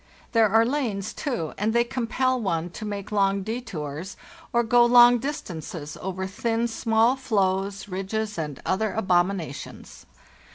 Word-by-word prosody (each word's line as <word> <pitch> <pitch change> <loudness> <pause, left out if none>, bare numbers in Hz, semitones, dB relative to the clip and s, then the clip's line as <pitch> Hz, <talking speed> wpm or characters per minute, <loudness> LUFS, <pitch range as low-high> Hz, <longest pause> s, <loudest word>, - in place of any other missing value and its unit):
There 225 -3 +4
are 225 +3 +4
lanes, 235 -7 -2
too, 235 - -3
and 215 +2 +1
they 235 0 +4
compel 255 +1 -1
one 170 -4 -1
to 215 - -7
make 205 -1 -5
long 195 -1 +2
detours 185 - -5 0.3
or 235 0 +2
go 240 +1 +5
long 240 0 +7
distances 165 - -5
over 190 0 -3
thin, 225 +4 -1
small 225 +2 +2
floes, 200 -6 -1
ridges, 205 +3 -3
and 150 -4 -4
other 205 +2 0
abominations. 180 -6 -2
210 Hz, 135 wpm, -25 LUFS, 190-235 Hz, 0.3 s, long